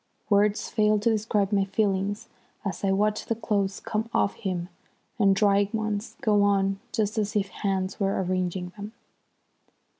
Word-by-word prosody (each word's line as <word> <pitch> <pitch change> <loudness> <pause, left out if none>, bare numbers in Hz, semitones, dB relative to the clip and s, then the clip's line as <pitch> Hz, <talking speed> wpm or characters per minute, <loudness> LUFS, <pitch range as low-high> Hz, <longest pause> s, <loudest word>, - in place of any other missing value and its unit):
Words 205 +1 +3
fail 215 -1 +2
to 215 +3 +2
describe 210 -2 0
my 200 -1 +3
feelings 200 0 -1 0.4
as 195 - -4
I 195 - +2
watched 210 +2 +1
the 230 - +1
clothes 200 -3 -1
come 220 +1 -3
off 200 - +2
him 180 -3 -3 0.5
and 195 -2 +5
dry 200 0 +3
ones 215 -1 -3
go 210 -2 +3
on 195 -1 +2
just 215 0 0
as 210 +1 -2
if 200 -2 +1
hands 190 -2 -2
were 195 -1 +1
arranging 180 0 -2
them. 210 +1 -8
205 Hz, 155 wpm, -26 LUFS, 195-210 Hz, 0.5 s, and